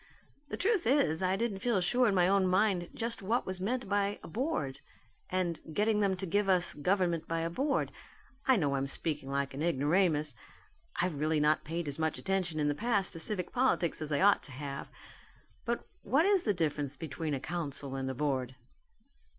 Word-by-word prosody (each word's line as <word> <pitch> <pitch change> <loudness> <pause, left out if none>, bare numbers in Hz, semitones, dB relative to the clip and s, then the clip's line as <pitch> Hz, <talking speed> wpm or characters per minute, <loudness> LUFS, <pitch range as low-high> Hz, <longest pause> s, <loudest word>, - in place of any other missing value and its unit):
"The - - -4
truth 400 - +1
is 230 - +3
I 185 0 +2
didn't 210 -2 -2
feel 235 -2 +1
sure 245 +8 +3
in 200 - +2
my 180 -1 +4
own 195 -1 +3
mind 185 -2 +2
just 230 0 -3
what 225 +6 0
was 185 -1 -4
meant 245 +4 -1
by 200 0 +1
a - - -8
'Board,' 210 - -2 0.5
and 175 -3 -1
'getting 210 +3 +2
them 200 -2 +2
to 190 +1 -4
give 200 +3 +1
us 180 -2 +4
government 170 0 0
by 165 0 -1
a 165 0 -2
Board.' 275 - 0 0.6
I 260 - +6
know 145 -9 +1
I'm 135 0 0
speaking 145 -1 -2
like 140 0 -1
an 140 - -5
ignoramus. 155 -1 +2 0.6
I've 175 -5 -1
really 155 +1 +1
not 155 +1 +3
paid 165 +1 -4
as 145 +2 -4
much 160 -1 0
attention 185 -5 -1
in 150 - +2
the 145 - +2
past 205 +2 +1
to 165 - -6
civic 180 +1 -1
politics 240 -11 +1
as 155 -1 -4
I 145 - +1
ought 200 +1 +5
to - - -7
have. 140 +1 -6 0.8
But 235 -1 -2 0.2
what 280 +6 +3
is 395 -2 +4
the 215 - +1
difference 145 -4 -1
between 155 0 -3
a - - -3
council 140 -3 -4
and 135 0 -2
a 130 - -3
board?" 130 -2 -1
175 Hz, 200 wpm, -31 LUFS, 150-205 Hz, 0.8 s, I